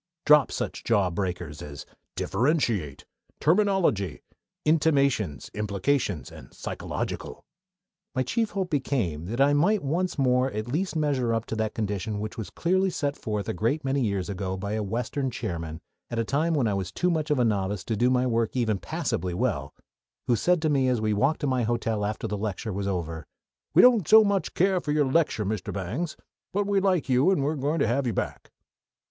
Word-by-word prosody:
Drop 150 -3 +6
such - - -4
jawbreakers 90 -6 -1
as 70 -1 -8 0.3
differentiate, 115 - 0 0.3
terminology, 170 - +2 0.4
intimations, 140 - +2
implications, 105 - -1
and - - -12
psychological." - - -5 0.7
My 130 - +2
chief 225 - 0
hope 190 -3 -3
became 110 - -1
that 120 +5 -4
I 140 +1 +5
might 185 +8 +3
once 175 +6 -1
more 130 -1 +3
at 110 +2 -3
least 165 +8 -1
measure 135 -7 +1
up 115 - -2
to - - -4
that 110 0 -1
condition 105 0 -2
which 110 +1 -5
was 110 -5 -5
clearly 190 +2 +1
set 145 -5 -2
forth 105 -3 -3
a - - -1
great 120 - -1
many 135 +1 +1
years 100 -5 -1
ago 95 -1 -3
by 100 +2 -4
a 110 - -1
Western 120 +6 -2
chairman, 85 -9 -5 0.3
at 120 - -4
a 115 - +1
time 155 +7 +1
when 140 -5 +2
I 105 - +1
was 95 -3 -3
too 180 0 +1
much 155 -2 -1
of 150 - +2
a 125 - +3
novice 100 -2 0
to 115 - -2
do 120 +4 +3
my 125 0 +2
work 115 -1 0
even 110 -5 +1
passably 90 0 -2
well, 90 - -1 0.5
who 120 - +3
said 175 - +2
to 155 - +2
me 135 -2 +2
as 125 -2 +1
we 110 -1 +1
walked 135 +11 +1
to - - 0
my 130 -2 +1
hotel 115 -2 -1
after 105 +2 -3
the 105 -1 -3
lecture 105 +1 -3
was 100 +1 -2
over: 85 -4 -3 0.5
"We 175 - +8
don't 250 -2 +7
care 155 - -10
so 220 0 +9
much 200 -2 +1 0.3
for 150 - -2
your 150 -1 +3
lecture, 135 -6 +1
Mr. 105 -1 -3
Bangs; 110 - -3 0.4
but 205 +1 +1
we 200 -1 +2
like 185 -4 +1
you, 130 +5 +4
and 185 -8 +2
we're 145 +3 +1
going 145 +2 -1
to - - +2
have 130 +2 +1
you 115 - 0
back." - - -4
120 Hz, 195 wpm, -26 LUFS, 100-150 Hz, 0.7 s, so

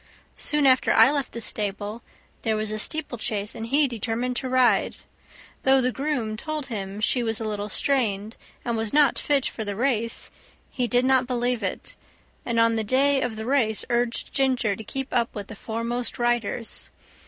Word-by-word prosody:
Soon 295 -1 +2
after 260 -1 +4
I 270 - +6
left 285 -2 -2
the 235 - -6
stable 210 +1 -2 0.4
there 220 -2 0
was 215 0 -3
a 215 - -2
steeplechase, 220 -7 -1
and 225 0 -6
he 285 +4 +3
determined 245 +1 -2
to 260 - -3
ride. 255 -1 +3 0.7
Though 265 0 +5
the 255 0 +1
groom 260 -6 -2
told 310 +3 -4
him 200 -4 -5
she 245 +3 +2
was 225 -2 -2
a - - -4
little 210 -1 -3
strained, 220 -4 +1 0.3
and 235 -1 -1
was 225 -1 -1
not 290 -3 +4
fit 280 -3 +1
for 220 - -3
the 205 -1 -4
race, 230 -1 0 0.4
he 250 -3 -1
did 245 +1 +3
not 260 -1 +3
believe 245 -1 0
it, 190 -2 -4 0.5
and 235 -1 +1
on 230 0 +3
the 220 - 0
day 270 +5 +3
of 245 -3 -2
the 220 0 -6
race 235 -5 +1
urged 240 0 -1
Ginger 255 -6 +1
to 220 - -9
keep 270 +5 -5
up 235 -1 0
with 205 -2 -6
the 220 - -7
foremost 230 +3 -3
riders. 240 -1 -2
235 Hz, 185 wpm, -25 LUFS, 220-260 Hz, 0.7 s, I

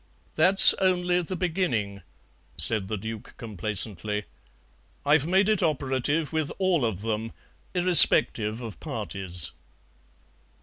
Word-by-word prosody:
"That's 185 +5 +7
only 180 -2 -1
the 180 +2 -7
beginning," 150 - -4 0.6
said 105 -4 +3
the 110 - -5
Duke 110 +2 -10
complacently; 105 -1 -3 0.8
"I've 145 +1 +1
made 190 +3 0
it 215 -3 0
operative 145 0 -3
with 155 -2 -3
all 185 -6 -1
of 110 -5 -4
them, 110 +1 -6 0.4
irrespective 125 -10 +5
of 110 -9 -10
parties." 90 -4 -6
130 Hz, 105 wpm, -23 LUFS, 105-175 Hz, 0.8 s, That's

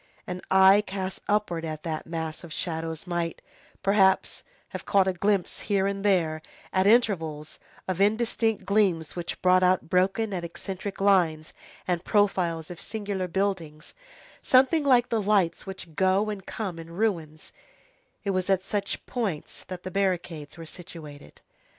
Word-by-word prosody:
An 180 0 -5
eye 190 +1 +7
cast 190 -1 -4
upward 205 -5 0
at 155 -1 -5
that 160 -2 -4
mass 160 -1 -4
of 170 - -10
shadows 160 0 -3
might, 175 -2 -2 0.4
perhaps, 195 -1 +3 0.3
have - - -7
caught 195 -2 +3
a 190 - +2
glimpse 195 +1 0
here 195 -2 +2
and 200 0 -2
there, 165 -6 +2 0.3
at 190 +1 +3
intervals, 165 -10 +1 0.3
of 185 0 -1
indistinct 225 +1 +1
gleams 190 -7 +1
which 175 -1 -4
brought 185 0 +5
out 185 -2 +2
broken 195 +4 +2
and 175 -2 -3
eccentric 190 +3 -6
lines, 175 -6 +2 0.3
and 175 -1 0
profiles 180 -6 +1
of 175 - -8
singular 200 -3 -3
buildings, 170 -5 -2 0.5
something 270 +5 +4
like 250 -4 +4
the 225 -2 +1
lights 195 -4 +1
which 190 -4 -7
go 190 +5 +2
and 195 -2 -7
come 190 -7 -4
in 165 0 -9
ruins; 165 -7 -2 0.7
it 200 - 0
was 185 0 -1
at 190 -1 +2
such 200 0 -3
points 210 -11 -3
that 180 -1 -7
the 185 - -5
barricades 175 -6 -2
were 165 - -8
situated. 155 -4 -10
185 Hz, 150 wpm, -27 LUFS, 165-200 Hz, 0.7 s, eye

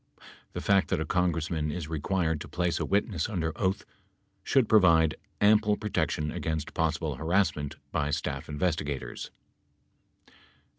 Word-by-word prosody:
The - - -4
fact 100 -1 +3
that - - +1
a 80 - -1
Congress 85 -1 0
man 75 -2 -1
is 80 0 -4
required 80 0 -1
to - - -7
place 85 -1 -1
a - - -1
witness 100 -3 0
under 80 -6 -2
oath 95 0 -1 0.6
should 130 -5 +3
provide 85 -7 +5 0.3
ample 105 0 +4
protection 80 -7 -1
against 80 -2 -3
possible 80 -2 -1
harassment 80 -3 0 0.2
by 75 -2 0
staff - - -3
investigators. 75 -3 -2
80 Hz, 135 wpm, -28 LUFS, 75-95 Hz, 0.6 s, provide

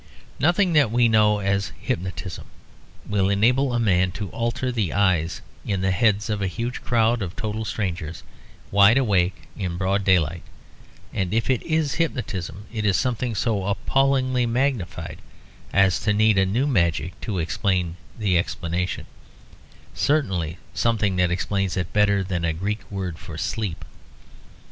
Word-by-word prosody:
Nothing 175 +5 +3
that 145 -6 +5
we 120 +1 +3
know 105 -2 +4
as 100 -4 0
hypnotism 90 +1 -4 0.6
will 100 -2 +1
enable 125 +7 +3
a 120 - 0
man 95 -5 +3
to 100 -1 -5
alter 120 +2 -1
the 110 -9 -1
eyes 90 -5 +1 0.2
in 95 -2 -2
the 95 0 +1
heads 105 +2 +2
of 105 -2 -2
a 95 - +1
huge 115 +6 -4
crowd 115 0 +2
of 90 -2 -4
total 110 0 -3
strangers; 85 -7 -4 0.5
wide 100 +4 +6
awake 95 -8 +1
in 90 -4 -3
broad 100 +2 0
daylight; 85 -4 +2 0.7
and 95 +1 -1
if 115 +3 +1
it 125 - +1
is 155 -3 0
hypnotism, 105 - -3
it 110 -2 -2
is 100 -4 +3
something 125 0 -1
so 100 -2 0
appallingly 130 +3 +1
magnified 125 -5 -2 0.5
as 95 -2 +3
to 105 0 +1
need 110 -1 +4
a 95 - +3
new 115 +8 +1
magic 90 - 0
to 105 -4 -3
explain 90 +1 0 0.2
the 100 -6 +2
explanation; 85 +1 -2 0.9
certainly 95 - 0 0.2
something 105 -4 +1
that 90 -1 +3
explains 95 +1 -1
it 90 -1 -3
better 100 -2 +3
than 90 -2 -3
a 80 -1 +1
Greek 100 +6 -4
word 95 -4 -4
for 80 - -8
sleep. 100 -2 -3
100 Hz, 150 wpm, -23 LUFS, 90-115 Hz, 0.9 s, wide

